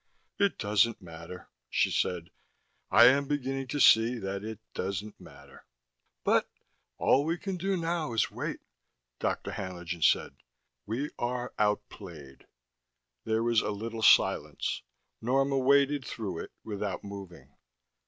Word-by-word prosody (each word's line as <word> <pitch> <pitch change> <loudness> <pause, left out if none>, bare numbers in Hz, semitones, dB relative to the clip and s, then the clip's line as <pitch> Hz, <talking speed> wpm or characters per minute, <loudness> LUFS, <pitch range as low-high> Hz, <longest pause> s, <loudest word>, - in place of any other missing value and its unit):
"It 200 -1 +2
doesn't 105 +2 +2
matter," 85 0 -10 0.2
she - - +2
said. 85 -2 -1 0.6
"I - - +8
am 140 +2 +5
beginning 135 -2 -2
to 145 - -3
see 115 -1 +6
that 100 -2 -4
it 110 0 -5 0.2
doesn't 100 +3 -4
matter." 70 -1 -15 0.6
"But - - +2 0.2
" - - -48
"All 140 - +3
we 165 +3 -1
can 190 +2 -4
do 190 +2 -1
now 165 -5 -2
is 115 - +1
wait," - - -4 0.6
Dr. - - -2
Haenlingen 90 -2 -5
said. - - +2 0.5
"We 130 +8 -2
are 120 0 -2
outplayed." 90 -9 -3 0.8
There 110 0 +1
was 115 -2 +3
a - - -2
little 110 +2 -4
silence. - - +3 0.4
Norma 135 +3 +2
waited 140 +1 +3
through 100 -8 -5
it - - -19
without 100 -3 -4
moving. 100 -3 -10
110 Hz, 135 wpm, -29 LUFS, 95-135 Hz, 0.8 s, I